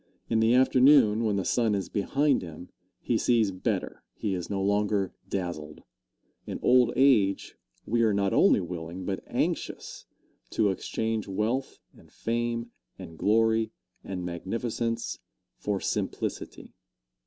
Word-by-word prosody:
In 115 Hz, -, +3 dB
the 110 Hz, +2 st, +4 dB
afternoon, 130 Hz, -3 st, +5 dB
when 105 Hz, -2 st, +1 dB
the 95 Hz, -, -1 dB
sun 115 Hz, -4 st, +2 dB
is 95 Hz, -, -2 dB
behind 140 Hz, +7 st, +1 dB
him, 85 Hz, 0 st, -9 dB, 0.3 s
he -, -, 0 dB
sees 115 Hz, -5 st, +2 dB
better 90 Hz, 0 st, -3 dB
he 100 Hz, -, -2 dB
is 90 Hz, -2 st, -4 dB
no 100 Hz, -, -2 dB
longer 100 Hz, -1 st, +1 dB, 0.2 s
dazzled. 85 Hz, -6 st, -4 dB, 0.6 s
In -, -, -4 dB
old 125 Hz, -1 st, +5 dB
age 115 Hz, -8 st, +3 dB, 0.3 s
we 115 Hz, +2 st, +1 dB
are 110 Hz, -2 st, +4 dB
not 100 Hz, -1 st, +1 dB
only -, -, +5 dB
willing, 85 Hz, +1 st, -6 dB
but 95 Hz, 0 st, -3 dB
anxious, -, -, -3 dB, 0.4 s
to 105 Hz, -3 st, +2 dB
exchange 110 Hz, +3 st, -3 dB
wealth 110 Hz, +7 st, -2 dB, 0.2 s
and -, -, -19 dB
fame 115 Hz, 0 st, -2 dB, 0.3 s
and 85 Hz, -4 st, -10 dB
glory 110 Hz, +4 st, +2 dB, 0.3 s
and 90 Hz, -2 st, -5 dB
magnificence, 115 Hz, +6 st, -3 dB, 0.4 s
for 105 Hz, -2 st, -1 dB
simplicity. -, -, -4 dB
105 Hz, 130 wpm, -27 LUFS, 95-115 Hz, 0.6 s, afternoon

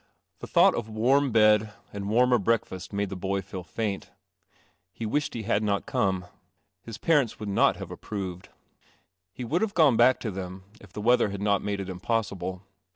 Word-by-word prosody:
The -, -, -8 dB
thought -, -, +5 dB
of 110 Hz, -2 st, -4 dB
warm 130 Hz, +5 st, +2 dB
bed 110 Hz, -1 st, +4 dB, 0.2 s
and 100 Hz, 0 st, -4 dB
warmer 125 Hz, +2 st, +4 dB
breakfast 100 Hz, -3 st, -1 dB
made 100 Hz, -1 st, -2 dB
the 95 Hz, -, -5 dB
boy 95 Hz, +1 st, -2 dB
feel 95 Hz, 0 st, -7 dB
faint. 100 Hz, +2 st, -4 dB, 0.8 s
He 115 Hz, -, -6 dB
wished 145 Hz, +6 st, -1 dB
he 115 Hz, -, -4 dB
had 105 Hz, -1 st, +1 dB
not 100 Hz, -2 st, 0 dB
come. 95 Hz, -2 st, 0 dB, 0.6 s
His 115 Hz, 0 st, -8 dB
parents 145 Hz, -7 st, +1 dB
would 105 Hz, -1 st, -5 dB
not 100 Hz, -, +3 dB
have -, -, -8 dB
ap -, -, -9 dB
proved. 95 Hz, -4 st, -6 dB, 0.8 s
He 125 Hz, -, -7 dB
would 160 Hz, +9 st, 0 dB
have 220 Hz, -2 st, -1 dB
gone 150 Hz, -8 st, +5 dB
back 125 Hz, +2 st, +5 dB
to 110 Hz, -, -3 dB
them 95 Hz, 0 st, -7 dB, 0.2 s
if 100 Hz, -, -16 dB
the 105 Hz, -, -6 dB
weather 120 Hz, 0 st, +3 dB
had 100 Hz, 0 st, -5 dB
not 100 Hz, -1 st, +2 dB
made 100 Hz, -1 st, -3 dB
it 95 Hz, -, -4 dB
impossible. 95 Hz, -1 st, -3 dB
105 Hz, 190 wpm, -27 LUFS, 95-115 Hz, 0.8 s, thought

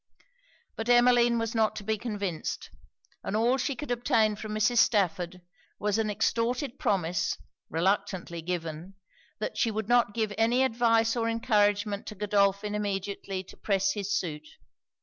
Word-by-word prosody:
But 225 Hz, +2 st, -4 dB
Emmeline 240 Hz, -1 st, +5 dB
was 230 Hz, -1 st, -2 dB
not 220 Hz, -2 st, +2 dB
to 215 Hz, -, -6 dB
be 220 Hz, +2 st, 0 dB
convinced; 200 Hz, -7 st, -4 dB, 0.5 s
and -, -, -3 dB
all 235 Hz, +4 st, +3 dB
she 265 Hz, +2 st, -1 dB
could 295 Hz, +1 st, -6 dB
obtain 225 Hz, -3 st, +2 dB
from 215 Hz, 0 st, -6 dB
Mrs. 225 Hz, +3 st, +3 dB
Stafford 180 Hz, -4 st, +1 dB, 0.3 s
was 210 Hz, +1 st, 0 dB
an 220 Hz, -1 st, 0 dB
extorted 235 Hz, +5 st, -1 dB
promise, 180 Hz, -3 st, 0 dB, 0.3 s
reluctantly 180 Hz, 0 st, -1 dB
given, 170 Hz, +1 st, -5 dB, 0.4 s
that -, -, -4 dB
she 230 Hz, -, +3 dB
would 220 Hz, -1 st, -3 dB
not 240 Hz, -3 st, +3 dB
give 220 Hz, -2 st, -1 dB
any 240 Hz, +3 st, +3 dB
advice 230 Hz, -2 st, +2 dB
or 230 Hz, -1 st, 0 dB
encouragement 205 Hz, -3 st, +1 dB
to 215 Hz, -, -6 dB
Godolphin 200 Hz, 0 st, +1 dB
immediately 200 Hz, -2 st, -3 dB
to -, -, -14 dB
press 195 Hz, -1 st, +1 dB
his 205 Hz, 0 st, -4 dB
suit. 155 Hz, -3 st, -4 dB
210 Hz, 150 wpm, -28 LUFS, 195-230 Hz, 0.5 s, Emmeline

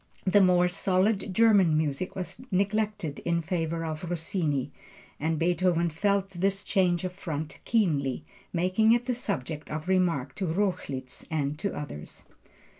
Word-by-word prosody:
The 195 Hz, +2 st, +5 dB
more 180 Hz, -1 st, +5 dB
solid 195 Hz, +2 st, +1 dB
German 195 Hz, -6 st, +5 dB
music 155 Hz, +3 st, -1 dB
was 185 Hz, +4 st, -5 dB
neglected 205 Hz, -4 st, 0 dB
in 170 Hz, -1 st, 0 dB
favor 165 Hz, -1 st, -2 dB
of 160 Hz, +2 st, -4 dB
Rossini, 160 Hz, -, -1 dB, 0.5 s
and 160 Hz, +2 st, 0 dB
Beethoven 170 Hz, 0 st, +2 dB
felt 195 Hz, +3 st, 0 dB
this 195 Hz, +2 st, 0 dB
change 180 Hz, -4 st, +1 dB
of 185 Hz, -1 st, -3 dB
front 160 Hz, -5 st, -5 dB
keenly, 150 Hz, -, +1 dB, 0.3 s
making 185 Hz, +6 st, +3 dB
it 240 Hz, 0 st, +1 dB
the 250 Hz, -, 0 dB
subject 160 Hz, -, -4 dB
of 155 Hz, +2 st, -4 dB
remark 170 Hz, -8 st, +1 dB
to 190 Hz, -, -1 dB
Rochlitz 160 Hz, -8 st, -2 dB
and 150 Hz, -3 st, -1 dB
to 200 Hz, +2 st, -2 dB
others. 110 Hz, -, -7 dB
180 Hz, 140 wpm, -28 LUFS, 155-195 Hz, 0.5 s, The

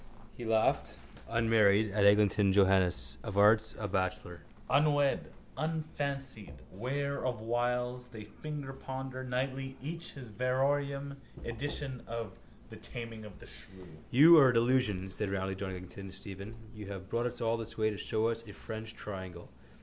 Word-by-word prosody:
He 120 Hz, -, -7 dB
laughed, 110 Hz, -1 st, +2 dB, 0.3 s
unmarried, 110 Hz, -2 st, +4 dB
at 100 Hz, 0 st, +3 dB
Eglinton 100 Hz, -1 st, +5 dB
Johannes, 95 Hz, -9 st, +3 dB
of 105 Hz, -3 st, -5 dB
arts 110 Hz, +2 st, +5 dB
a 105 Hz, -, -3 dB
bachelor. 95 Hz, -3 st, -2 dB, 0.3 s
Unwed, 145 Hz, -1 st, +3 dB, 0.2 s
unfancied, 140 Hz, -7 st, -3 dB, 0.2 s
ware 140 Hz, +7 st, -2 dB
of 125 Hz, -3 st, -1 dB
wiles, 125 Hz, +2 st, -1 dB
they 115 Hz, -3 st, -9 dB
fingerponder 135 Hz, 0 st, -6 dB
nightly 130 Hz, +1 st, -2 dB
each 165 Hz, +5 st, -5 dB
his 125 Hz, -5 st, -9 dB
variorum 140 Hz, +4 st, 0 dB, 0.3 s
edition 130 Hz, +2 st, -3 dB
of 115 Hz, -4 st, -5 dB, 0.3 s
The -, -, -10 dB
Taming 115 Hz, -2 st, -6 dB
of 105 Hz, -3 st, -11 dB
the -, -, -13 dB
Shrew. 95 Hz, -2 st, -10 dB, 0.2 s
—You 160 Hz, +6 st, +9 dB
are 135 Hz, -3 st, +7 dB
a -, -, +3 dB
delusion, 115 Hz, -6 st, +2 dB
said 105 Hz, +1 st, -2 dB
roundly 95 Hz, 0 st, -1 dB
John 95 Hz, 0 st, -4 dB
Eglinton 95 Hz, +1 st, -7 dB
to 95 Hz, -, -10 dB
Stephen. 100 Hz, +2 st, -7 dB, 0.2 s
You 105 Hz, -2 st, -8 dB
have 95 Hz, -1 st, -7 dB
brought 120 Hz, +4 st, 0 dB
us 120 Hz, -, -5 dB
all 115 Hz, 0 st, +1 dB
this 115 Hz, 0 st, -6 dB
way 110 Hz, 0 st, +2 dB
to 105 Hz, -, -5 dB
show 110 Hz, +2 st, +1 dB
us 115 Hz, 0 st, -1 dB
a 100 Hz, -, -9 dB
French 110 Hz, +2 st, -7 dB
triangle. 95 Hz, -4 st, -7 dB
115 Hz, 155 wpm, -32 LUFS, 100-130 Hz, 0.3 s, You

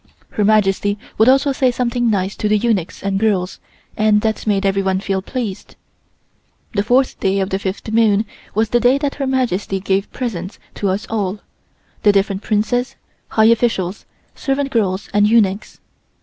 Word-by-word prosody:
Her 210 Hz, -, -1 dB
Majesty 205 Hz, -1 st, +2 dB, 0.2 s
would 220 Hz, +3 st, +6 dB
also 275 Hz, +2 st, +4 dB
say 265 Hz, -1 st, +2 dB
something 240 Hz, -1 st, 0 dB
nice 195 Hz, -2 st, -1 dB
to 210 Hz, -, -1 dB
the 215 Hz, -, +4 dB
eunuchs 205 Hz, -6 st, -1 dB
and 195 Hz, 0 st, 0 dB
girls, 195 Hz, -4 st, 0 dB, 0.4 s
and 215 Hz, -1 st, +3 dB
that 220 Hz, 0 st, -2 dB
made 200 Hz, -1 st, +1 dB
everyone 195 Hz, -1 st, +1 dB
feel 195 Hz, -1 st, -2 dB
pleased. 220 Hz, -2 st, -5 dB, 1.0 s
The 200 Hz, -, +1 dB
fourth 250 Hz, +5 st, +1 dB
day 195 Hz, +1 st, +1 dB
of 190 Hz, 0 st, -2 dB
the 190 Hz, -, 0 dB
fifth 195 Hz, +3 st, -4 dB
moon 220 Hz, -2 st, +3 dB, 0.3 s
was 220 Hz, +1 st, +1 dB
the 240 Hz, -, +3 dB
day 245 Hz, +3 st, +4 dB
that 280 Hz, -1 st, -2 dB
Her 270 Hz, -, 0 dB
Majesty 230 Hz, -7 st, -1 dB
gave 195 Hz, +1 st, -1 dB
presents 195 Hz, -7 st, -5 dB, 0.2 s
to 200 Hz, -, -2 dB
us 195 Hz, +3 st, -2 dB
all, 205 Hz, -2 st, -2 dB, 0.6 s
the 205 Hz, -, +5 dB
different 195 Hz, 0 st, 0 dB
Princes, 225 Hz, +4 st, 0 dB, 0.3 s
high 220 Hz, -, +2 dB
officials, 215 Hz, -5 st, -2 dB, 0.3 s
servant 275 Hz, 0 st, -2 dB
girls 195 Hz, -5 st, 0 dB
and 205 Hz, 0 st, +4 dB
eunuchs. 210 Hz, -3 st, +1 dB
210 Hz, 165 wpm, -18 LUFS, 195-235 Hz, 1.0 s, would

